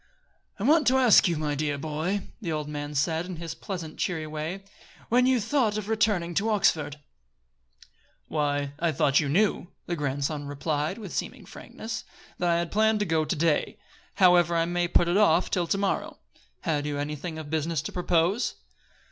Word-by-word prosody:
"I 200 - -5
want 300 +3 +4
to 260 +1 +5
ask 245 -6 +6
you, 170 -2 0
my 150 -1 -1
dear 145 0 -1
boy," 160 +7 -2 0.2
the 175 -6 -3
old 150 -1 -2
man 145 0 -5
said, 160 +4 0
in 185 - -5
his 165 0 -6
pleasant, 175 -5 -7
cheery 165 -4 -1
way, 155 +5 -5 0.5
"when 250 +2 +4
you 260 -1 +3
thought 225 -1 +1
of 210 -1 -4
returning 210 -6 +1
to 205 +5 0
Oxford." 155 -8 +1 1.3
"Why, 145 -2 -1
I 170 -1 +1
thought 140 0 +3
you 150 -3 -1
knew," 190 +2 +1 0.2
the 175 - -2
grandson 145 0 -2
replied 150 +4 -2
with 205 -6 -8
seeming - - -4
frankness, 225 +1 -7 0.4
"that 175 - +1
I 170 - +3
had 170 -1 -2
planned 220 +1 +3
to - - +1
go 160 -3 +1
to 150 - -1
day. 155 -1 +1 0.4
However, 175 -3 +5
I 165 0 +2
may 175 0 0
put 175 0 +3
it 175 +3 +2
off 185 -5 +3
till 175 -2 0
to 195 - +1
morrow. 195 -1 -1 0.4
Had 150 -4 -1
you 145 -1 -2
anything 150 +3 -4
of 155 -2 -8
business 160 -1 -1
to - - -5
propose?" 180 +5 +1
170 Hz, 185 wpm, -27 LUFS, 150-195 Hz, 1.3 s, ask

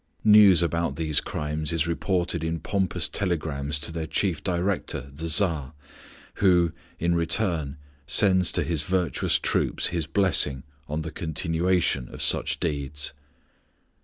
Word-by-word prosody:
News 105 -5 +7
about 85 -4 -1
these 80 -2 +2
crimes 75 +1 -3
is 80 -1 0
reported 85 0 -1
in 80 0 -2
pompous 95 +1 -1
telegrams 75 -6 -2
to 85 - -2
their 80 -1 -4
chief 90 -4 -1
director, 90 +1 -1
the 80 +4 -5
Tsar, 80 -5 0 0.6
who, 90 -4 +3 0.3
in 85 +1 0
return, 85 -4 0 0.3
sends 95 +3 +4
to - - +1
his 80 -3 -1
virtuous 90 -3 0
troops - - 0
his 85 -3 -2
blessing 75 -9 +1 0.3
on 75 +1 -2
the 80 - -6
continuation 80 -3 0
of - - -10
such - - +1
deeds. 70 -2 -3
85 Hz, 135 wpm, -25 LUFS, 75-90 Hz, 0.6 s, News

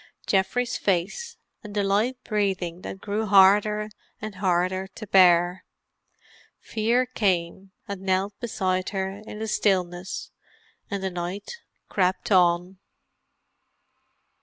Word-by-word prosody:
Geoffrey's 205 +6 +1
face, 200 - -1 0.3
and 210 -1 -9
the 205 - +1
light 210 +6 +1
breathing 190 -5 -1
that 190 - -7
grew 210 +1 -2
harder 205 +2 +5 0.3
and 215 0 -6
harder 185 0 0
to 215 +3 -10
bear. 180 -2 +4 1.0
Fear 230 +3 +1
came 190 -5 -1 0.2
and 200 -2 -5
knelt 190 +1 0
beside 185 -6 -1
her 195 0 -3
in - - -7
the 220 +1 -4
stillness, 185 -3 -1 0.6
and 200 -3 -3
the 190 - -1
night 180 - -5 0.3
crept 185 +1 0
on. 180 0 +3
195 Hz, 110 wpm, -25 LUFS, 185-210 Hz, 1.0 s, harder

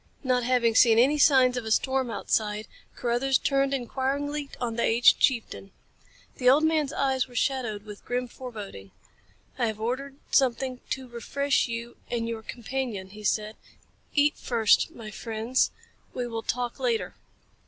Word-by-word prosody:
Not 255 -2 +2
having 240 -2 +2
seen 225 0 +6
any 275 +6 +4
signs 260 -4 +5
of 250 - -2
a 220 - -5
storm 260 +2 +1
outside 215 -1 -1 0.3
Carruthers 250 +2 +1
turned 275 -1 +1
inquiringly 275 +3 -2
on 235 -2 -2
the 235 - -1
aged 235 +2 +5
chieftain. 230 -6 0 0.7
The 250 -1 +4
old 285 +4 +5
man's 315 -3 +2
eyes 265 -4 0
were 245 - -16
shadowed 235 -5 -1
with 210 -1 -10
grim 250 +1 -2
foreboding. 210 - -9 0.7
"I 240 - +2
have 215 -1 -4
ordered 260 +5 -3 0.2
something 260 -1 +2
to 260 -1 -3
refresh 275 +4 0
you 235 0 -6
and 230 -1 -2
your 230 -1 -4
companion," 230 -4 -5
he 210 +1 -11
said. 215 +1 -1 0.6
"Eat 295 0 +3
first, 230 +1 +3
my 230 -9 -10
friends. 225 +3 0 0.5
We 250 - -2
will 230 -1 -4
talk 245 +1 -3
later." 470 -3 -1
245 Hz, 155 wpm, -27 LUFS, 225-270 Hz, 0.7 s, seen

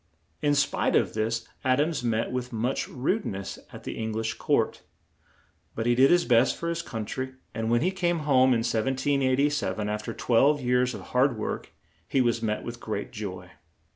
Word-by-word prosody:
In 145 -1 +3
spite 140 -1 +1
of - - +2
this, 115 +1 -1 0.2
Ad 130 +1 +3
ams 150 -3 0
met 115 -1 0
with 125 0 -3
much 120 +3 -1
rude 165 - -1
ness 95 0 -5
at - - -10
the - - -5
Eng 110 0 -2
lish 110 +1 -1
court; - - 0 0.9
but 110 - -2
he 120 - +4
did 130 +3 +5
his 175 0 +4
best 125 +1 +4
for 170 - -3
his 170 0 -1
coun 110 -8 -5
try, 130 +4 -4 0.2
and 110 0 -2
when 120 0 +3
he 180 +5 +2
came 175 -3 0
home 130 -3 +5
in 115 -2 +3
1787, 130 -3 +1
af 105 0 -2
ter 115 - -4
twelve 135 +7 +3
years 125 -1 +1
of - - -7
hard 125 -1 +3
work, 105 - -4 0.4
he 135 - +1
was 120 -2 +2
met 105 -2 -1
with 120 0 -6
great 105 -3 -4
joy. 95 -4 -6
125 Hz, 195 wpm, -27 LUFS, 110-135 Hz, 0.9 s, did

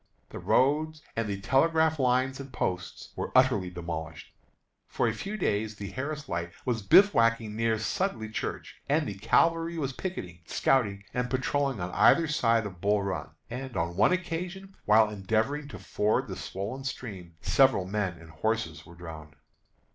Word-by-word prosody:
The - - -7
road 155 +4 +2 0.2
and 115 -1 -1
the 100 -1 -3
telegraph 160 +9 +2
lines 130 +1 +2
and 135 -1 -8
posts 90 -6 -3
were - - -4
utterly 125 -8 +4
demolished. 85 -2 -6 0.5
For - - 0
a - - 0
few 210 +2 -5
days 110 - -1
the 100 -1 -7
Harris 145 +3 -4
Light 85 0 -3
was 120 -3 0
bivouacking 115 - +4
near 115 0 +1
Sudley 115 - -2
Church, 110 - -5
and 150 +1 +2
the - - -3
cavalry 165 - +2
was 135 -4 -2
picketing, 95 - -5
scouting, 105 -7 +1
and 125 0 -1
patrolling 135 -1 0
on 90 0 -3
either 165 - +5
side 115 -7 +2
of 95 -4 -8
Bull 100 0 +2
Run; 95 -4 -3 0.2
and, 125 -1 -6
on 85 0 -1
one 105 +4 +4
occasion, 185 +2 -3
while 110 +1 +6
endeavoring 110 +8 -1
to - - -8
ford 105 +1 0
the - - -5
swollen 105 +8 -5
stream, 100 -10 -6
several 130 -9 +4
men 95 -1 -1
and 85 -1 -14
horses 110 +8 -2
were 85 - -13
drowned. 80 -3 -10
115 Hz, 160 wpm, -28 LUFS, 100-140 Hz, 0.5 s, while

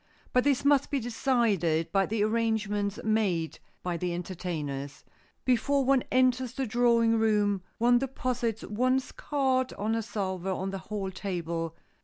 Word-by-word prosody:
But 250 - +4
this 280 -1 +2
must 285 -1 +4
be 280 - 0
decided 220 - +1
by 195 0 +2
the 215 -1 0
arrangements 215 -2 0
made 200 -7 0 0.2
by 175 -1 -2
the 175 0 -2
entertainers. 160 -6 -5 0.4
Before 265 +2 +2
one 270 -1 +3
enters 255 -1 +2
the 265 0 -2
drawing 230 -1 +3
room 205 -3 +2 0.2
one 240 +1 +4
deposits 245 -4 -2
one's 255 +5 0
cards 260 -3 0
on 210 +2 -2
the 225 0 +1
salver 190 -4 -3
on 190 +1 -2
the 195 - -4
hall 200 -3 -3
table. 170 -4 -3
220 Hz, 145 wpm, -29 LUFS, 190-250 Hz, 0.4 s, But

